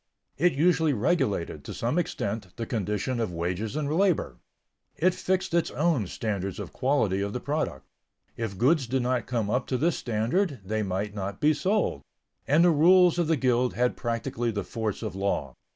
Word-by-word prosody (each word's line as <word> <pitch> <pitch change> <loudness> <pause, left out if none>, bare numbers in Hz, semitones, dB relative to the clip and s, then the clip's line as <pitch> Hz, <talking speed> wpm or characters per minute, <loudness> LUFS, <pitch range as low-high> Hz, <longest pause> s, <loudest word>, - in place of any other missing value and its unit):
It 175 +5 +3
usually 160 +1 +3
regulated, 125 - 0
to - - -7
some 120 +9 0
extent, 105 - -3
the 115 - -4
conditions 110 +3 -2
of 110 -5 -1
wages 90 +7 -3
and 150 -2 -1
labor. 165 - +1 0.6
It 185 +2 +3
fixed 185 -1 -1
its 170 -1 +2
own 150 - +1
standards 100 -2 -3
of - - -7
quality 110 -8 +1
of 100 +1 -2
the 125 - -2
product; 140 - -3 0.5
if 110 -4 -4
goods 135 - +3
did 130 +1 0
not 125 -1 0
come 115 -4 -1
up 125 +2 0
to 130 - 0
this 165 +6 +1
standard, 125 - 0
they 110 +2 -1
might 100 +1 -2
not 100 -1 -5
be 150 +1 +4
sold, 190 - 0 0.5
and 155 +4 +5
the 175 - +6
rules 175 +3 +5
of 170 - +1
the 160 -1 +2
guild 125 -1 +1
had 125 0 +1
practically 115 0 -2
the 105 -2 -2
force 110 -3 -3
of - - -3
law. 95 -9 -2
125 Hz, 185 wpm, -27 LUFS, 105-155 Hz, 0.6 s, the